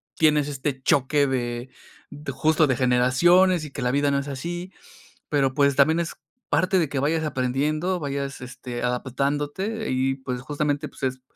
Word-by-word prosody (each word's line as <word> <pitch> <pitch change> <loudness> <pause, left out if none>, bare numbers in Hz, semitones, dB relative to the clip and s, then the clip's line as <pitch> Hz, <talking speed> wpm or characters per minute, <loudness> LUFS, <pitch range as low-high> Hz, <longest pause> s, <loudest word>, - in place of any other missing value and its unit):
tienes 150 -2 +3
este 135 -1 -3
choque 140 +2 +3
de 120 -1 -2 0.6
justo, 155 +3 +3
de 130 -3 +1
generaciones 155 +8 +4
y 150 - -9
que 140 - -6
la 125 0 +1
vida 145 +2 +2
no 140 - +2
es 140 - -5
así. 175 +7 -5 0.6
Pero, 135 -3 +2
pues, 140 -1 +3
también 160 +4 +4
es 170 - -4 0.3
parte 185 +1 +2
de 165 -4 +1
que 140 - -3
vayas 160 +3 +1
aprendiendo, 150 +7 -1
vayas, 140 -1 -4
este, 125 -1 -7
adaptándote 145 - -2
y, 130 +1 0
pues, 130 -2 -5
justamente, 145 +1 -2
pues, - - -17
es 130 0 -2
140 Hz, 165 wpm, -24 LUFS, 130-155 Hz, 0.6 s, generaciones